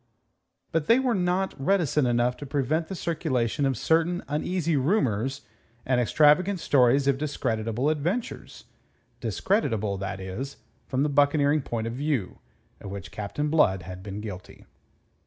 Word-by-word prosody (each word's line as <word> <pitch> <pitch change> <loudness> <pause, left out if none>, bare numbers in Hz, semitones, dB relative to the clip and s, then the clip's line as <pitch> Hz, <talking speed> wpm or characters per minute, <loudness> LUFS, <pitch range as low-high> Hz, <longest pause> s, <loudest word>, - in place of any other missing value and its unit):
But 160 -2 0
they 230 - +6
were 260 -2 +1
not 185 0 0
reticent 150 -6 +2
enough 120 +1 +1
to 145 - -7
prevent 145 +4 0
the 190 - -5
circulation 140 -7 -1
of 130 -3 -1
certain 165 +5 +1
uneasy 165 +2 -1
rumours 135 - 0 0.4
and 125 -1 +2
extravagant 155 - +4
stories 135 -1 +3
of 135 -1 +2
discreditable 115 -4 -1
adventures 165 +10 -2 0.6
discreditable, 110 - 0
that 100 0 -4
is, 95 +9 -6 0.3
from 130 +1 0
the 150 - +1
buccaneering 145 +1 +3
point 115 -3 -3
of 115 - -3
view 135 -7 -2 0.4
of 100 - -8
which 100 -2 -7
Captain 145 +9 -3
Blood 95 - +3
had 90 +2 -8
been 100 +1 -6
guilty. 100 -4 -9
140 Hz, 140 wpm, -26 LUFS, 115-160 Hz, 0.6 s, they